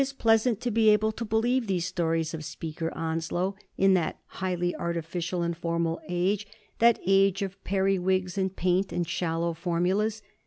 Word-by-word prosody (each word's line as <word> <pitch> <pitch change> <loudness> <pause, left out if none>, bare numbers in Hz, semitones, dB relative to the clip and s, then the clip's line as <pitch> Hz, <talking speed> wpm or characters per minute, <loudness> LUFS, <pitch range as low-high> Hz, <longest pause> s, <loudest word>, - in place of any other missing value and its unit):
371 275 0 -7
pleasant 225 0 +4
to 245 -1 -1
be 220 0 +4
able 215 +1 +4
to 230 - -5
believe 230 +3 +1
these 180 -3 0
stories 165 -3 -1
of 160 -1 -5
Speaker 160 +2 -5
Onslow 165 +3 -1 0.2
in 195 0 +5
that 175 -4 0
highly 180 -1 -2
artificial 170 +1 -2
and 170 0 -1
formal 170 0 -1
age 190 +4 0 0.2
— - - -35
that 235 0 +6
age 195 +1 +3
of 195 0 -6
periwigs, 190 -1 +1
and 190 -1 -1
paint, 185 +2 +1
and 175 -1 -1
shallow 170 0 -1
formulas. 185 +6 0
185 Hz, 165 wpm, -27 LUFS, 170-205 Hz, 0.2 s, that